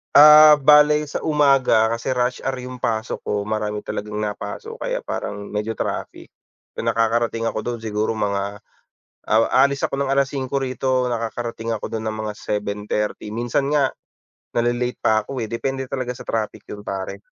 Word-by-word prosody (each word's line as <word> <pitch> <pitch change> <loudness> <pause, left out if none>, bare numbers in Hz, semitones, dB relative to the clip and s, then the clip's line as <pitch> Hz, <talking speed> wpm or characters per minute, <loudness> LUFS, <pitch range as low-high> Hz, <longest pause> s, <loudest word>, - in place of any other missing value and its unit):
Ah, 150 +1 +10
bale 150 +1 +5
sa 145 - -4
umaga 135 -7 +3
kasi 115 +3 -2
rush 125 0 0
hour 135 0 -2
yung 125 0 -8
pasok 110 0 -2
ko. 105 -1 0
Marami 105 0 -3
talagang 105 0 -5
napasok, 105 - -5
kaya - - -3
parang 100 - -5
medyo 105 +2 -2
traffic. - - -5 0.5
So, - - -4
nakakarating 115 0 +1
ako - - -3
do'n 120 -2 -3
siguro 110 0 -1
mga, 100 -1 -2 0.6
ah, 110 +1 +3
aalis 140 +1 +3
ako 135 - -4
ng 140 -1 0
5:00 135 0 0
rito, 130 -1 0
nakakarating 115 0 -3
ako 110 - -4
dun 110 0 -4
ng 110 0 -3
mga 105 -1 -4
7:30. 105 +1 -3
Minsan 120 +5 -1
nga, 140 -3 +3 0.6
nale-late 120 +1 0
pa 110 -1 +2
ko, 135 - -6
eh. 110 - -3
Depende 135 +3 -3
talaga 130 -2 -3
sa - - -11
traffic 110 -2 -3
'yon 105 - -8
pare. 100 +1 -5
115 Hz, 160 wpm, -22 LUFS, 110-135 Hz, 0.6 s, Ah